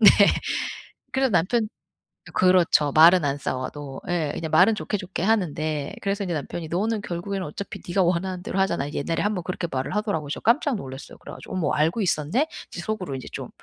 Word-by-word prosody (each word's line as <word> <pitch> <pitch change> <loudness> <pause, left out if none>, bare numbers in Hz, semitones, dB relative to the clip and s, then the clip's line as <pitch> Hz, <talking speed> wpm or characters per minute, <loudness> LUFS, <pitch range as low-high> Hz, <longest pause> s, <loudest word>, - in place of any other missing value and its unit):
네. 210 - +10 1.0
그래서 265 0 +2
남편 210 +6 +2 0.7
그렇죠. 180 -5 +4
말은 165 +2 +7
안 140 0 0
싸워도. 135 +1 -5
예. 160 -4 0
그냥 160 -1 -3
말은 185 +8 +6
좋게, 210 - -2
좋게 185 -2 -4
하는데 155 -8 0
그래서 200 +1 -1
인제 175 - -2
남편이 160 +2 -4
"너는 210 +4 0
결국에는 185 +1 -4
어차피 190 +6 -7
네가 190 +2 +1
원하는 180 +1 0
대로 190 - -2
하잖아." 170 -7 +1
이제 145 - -3
옛날에 165 +3 -1
1 210 0 +1
번 180 - -3
그렇게 180 0 -3
말을 130 +8 -2
하더라고요. 205 -8 -1
그래서 145 - -4
깜짝 255 +4 +3
놀랐어요 135 -8 -8
그래 - - -10
가지고. 190 - -8
'어머 180 - 0
알고 160 +9 +2
있었네?' 185 - +1 0.2
이제 175 - -6
속으로 185 -8 -3
인제 130 - -7
좀 - - -6
175 Hz, 435 characters per minute, -25 LUFS, 155-200 Hz, 1.0 s, 네